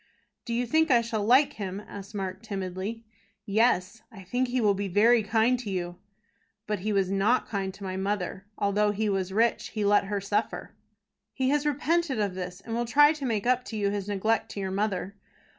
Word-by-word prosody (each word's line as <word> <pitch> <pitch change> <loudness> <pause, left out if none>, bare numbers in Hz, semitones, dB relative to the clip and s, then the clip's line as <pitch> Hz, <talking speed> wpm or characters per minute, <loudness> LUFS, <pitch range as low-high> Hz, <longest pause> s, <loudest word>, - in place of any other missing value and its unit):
"Do 235 - -2
you 245 +1 0
think 315 +6 +2
I 240 -3 +5
shall 225 -2 -2
like 270 +6 +4
him?" 195 -4 -5
asked 200 +2 -9
Mark, 190 -1 -4
timidly. 200 +1 -5 0.4
"Yes; 215 -1 +1
I 195 -3 -11
think 245 +8 -1
he 250 +1 -1
will 210 -3 +3
be 200 +1 -3
very 220 +5 +4
kind 225 +4 +2
to 230 -4 -6
you." 175 -2 -4 0.7
"But 210 -2 -2
he 210 +4 -2
was 195 -2 +1
not 200 +6 +2
kind 195 -2 -2
to 200 - -11
my 190 -1 -4
mother. 195 0 -3
Although 205 +1 +2
he 210 +1 0
was 190 -1 -1
rich, 230 +4 +1
he 215 -2 -3
let 205 0 +4
her 200 +1 -2
suffer." 205 +3 -2 0.6
"He 260 0 +1
has 295 +1 +1
repented 295 -2 0
of 200 -3 0
this, 180 0 -6
and 225 - -7
will 240 +1 0
try 290 +5 +5
to 295 -3 -6
make 220 -3 -1
up 250 0 +2
to 220 - -6
you 200 -1 +1
his 200 -1 -3
neglect 210 +3 0
to - - -5
your 190 -1 -3
mother." 200 0 -2
210 Hz, 210 wpm, -27 LUFS, 195-235 Hz, 0.7 s, I